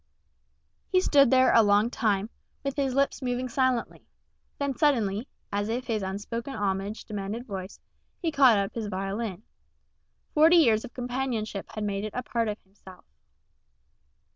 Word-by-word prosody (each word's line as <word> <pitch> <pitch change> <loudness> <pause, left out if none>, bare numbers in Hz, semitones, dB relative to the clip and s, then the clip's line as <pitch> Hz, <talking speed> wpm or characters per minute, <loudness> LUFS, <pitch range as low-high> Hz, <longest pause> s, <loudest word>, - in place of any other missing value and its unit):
He 370 - +5
stood 280 -7 +5
there 260 0 +5
a 230 - +7
long 205 +2 +3
time, 210 -2 0 0.3
with 275 -1 -2
his 270 -3 -1
lips 275 +1 +1
moving 250 0 -2
silently; 255 -1 -1 0.5
then 280 -2 -2
suddenly, 235 -6 +1 0.3
as 205 +1 -1
if 245 +3 -2
his 220 -3 -1
unspoken 220 +7 -4
homage 200 +1 -2
demanded 210 +3 -5
voice, 195 -3 -7 0.4
he 335 -3 -1
caught 265 -7 +6
up 200 0 -1
his 225 -2 -4
violin. 195 +1 -4 0.9
Forty 320 +3 +6
years 230 -10 +5
of - - -10
companionship 245 -5 -3
had 215 - -3
made 200 -1 -2
it 215 - -5
a 250 - -2
part 230 -2 -1
of 210 0 -2
himself. 190 -1 -16
230 Hz, 150 wpm, -27 LUFS, 205-260 Hz, 0.9 s, a